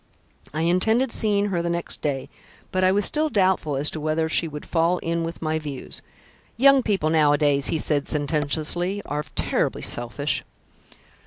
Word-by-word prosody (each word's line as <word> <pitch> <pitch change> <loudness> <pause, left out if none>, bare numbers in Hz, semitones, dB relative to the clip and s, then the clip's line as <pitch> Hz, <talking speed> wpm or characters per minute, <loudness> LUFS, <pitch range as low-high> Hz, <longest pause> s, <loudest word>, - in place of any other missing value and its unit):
I 155 - -3
intended 220 +9 +2
seeing 205 -2 +1
her 175 -3 -1
the 170 - -2
next 170 0 -1
day, 135 -3 -2 0.4
but 185 0 0
I 185 - +4
was 205 +1 +1
still 310 +1 +1
doubtful 185 - +1
as 140 +2 +4
to 155 - -5
whether 155 +1 0
she 165 +1 0
would 150 -1 -8
fall 170 +1 +1
in 170 -1 -2
with 165 0 -6
my 155 0 -1
views. 145 -4 -7 0.6
Young 275 +2 +6
people 195 -9 0
nowadays," 145 -2 +3
he - - 0
said 150 -2 +1
sententiously, 155 +6 -1
"are 150 +1 -3
terribly - - -1
selfish." 120 +5 -1
165 Hz, 165 wpm, -23 LUFS, 150-185 Hz, 0.6 s, Young